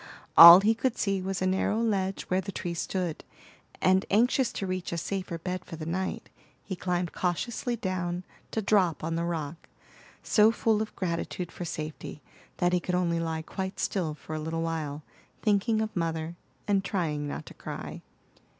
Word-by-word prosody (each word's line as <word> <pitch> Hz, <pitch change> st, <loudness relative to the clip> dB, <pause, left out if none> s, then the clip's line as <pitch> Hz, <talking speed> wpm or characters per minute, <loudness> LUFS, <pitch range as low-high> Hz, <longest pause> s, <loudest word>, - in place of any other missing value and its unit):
All 170 Hz, +2 st, +12 dB
he 215 Hz, +3 st, +4 dB
could 250 Hz, +2 st, -1 dB
see 195 Hz, -2 st, 0 dB
was 185 Hz, 0 st, -2 dB
a -, -, +1 dB
narrow 190 Hz, +3 st, +1 dB
ledge 195 Hz, -4 st, 0 dB
where 185 Hz, +1 st, 0 dB
the 195 Hz, -, -6 dB
tree 175 Hz, -2 st, -4 dB
stood, 175 Hz, -1 st, -3 dB, 0.6 s
and 185 Hz, +1 st, +4 dB
anxious 245 Hz, +4 st, +3 dB
to 195 Hz, -, -3 dB
reach 185 Hz, -1 st, -3 dB
a 170 Hz, -, -2 dB
safer 185 Hz, 0 st, -3 dB
bed 180 Hz, +2 st, -4 dB
for 165 Hz, -, -8 dB
the 155 Hz, -1 st, -7 dB
night, 185 Hz, +3 st, -3 dB, 0.4 s
he 190 Hz, -, -5 dB
climbed 180 Hz, -1 st, -1 dB
cautiously 235 Hz, +7 st, -1 dB
down 185 Hz, -4 st, -3 dB, 0.3 s
to 220 Hz, -, -2 dB
drop 185 Hz, -7 st, +2 dB
on 165 Hz, +1 st, -1 dB
the 165 Hz, +1 st, -1 dB
rock, 160 Hz, -2 st, -4 dB, 0.5 s
so 215 Hz, 0 st, +5 dB
full 225 Hz, -2 st, +1 dB
of 220 Hz, -, -5 dB
gratitude 170 Hz, -1 st, -3 dB
for 175 Hz, -, -6 dB
safety 155 Hz, -2 st, -6 dB, 0.4 s
that 175 Hz, 0 st, +2 dB
he 180 Hz, -, +3 dB
could 180 Hz, +1 st, -2 dB
only 170 Hz, -2 st, +1 dB
lie 160 Hz, -1 st, -2 dB
quite 190 Hz, +3 st, -5 dB
still 165 Hz, -6 st, -1 dB
for 150 Hz, +2 st, -9 dB
a 155 Hz, -, -2 dB
little 165 Hz, +1 st, -3 dB
while, 155 Hz, -3 st, -3 dB, 0.4 s
thinking 215 Hz, +1 st, +2 dB
of 215 Hz, -, -5 dB
mother, 165 Hz, -1 st, -2 dB, 0.3 s
and 200 Hz, -2 st, +2 dB
trying 160 Hz, -6 st, -2 dB
not -, -, -5 dB
to -, -, -11 dB
cry. -, -, -7 dB
180 Hz, 180 wpm, -28 LUFS, 165-195 Hz, 0.6 s, All